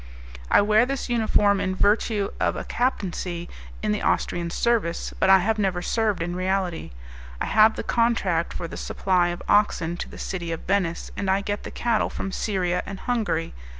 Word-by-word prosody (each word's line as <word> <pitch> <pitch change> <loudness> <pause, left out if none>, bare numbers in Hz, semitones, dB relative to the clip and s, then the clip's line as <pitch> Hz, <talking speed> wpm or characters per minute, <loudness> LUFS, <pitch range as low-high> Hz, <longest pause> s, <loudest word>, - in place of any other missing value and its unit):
"I - - +6
wear 215 +3 +4
this 275 -1 -3
uniform 210 -4 +2
in 185 -1 -1
virtue 205 0 +2
of - - +1
a - - -4
captaincy 180 -8 -2 0.4
in 215 - +1
the 210 - -1
Austrian 170 -1 0
service, 210 -3 0
but 190 - +3
I 190 - +9
have 215 +4 0
never 185 -3 0
served 215 -5 0
in 175 +1 -4
reality. 185 - -1 0.5
I - - -1
have 220 +1 +5
the - - -4
contract 205 -8 +1
for 170 - -5
the - - -8
supply 180 -2 +1
of 175 0 -4
oxen 175 -5 +2
to - - -5
the - - -11
City 175 -3 -4
of 165 - -4
Venice, 185 -4 -1
and 195 - -2
I 190 +1 +2
get 205 +1 -3
the - - -7
cattle 235 -2 0
from 195 - -5
Styria 185 -4 -1
and 195 -1 -7
Hungary. 220 -9 -1
195 Hz, 185 wpm, -24 LUFS, 175-215 Hz, 0.5 s, I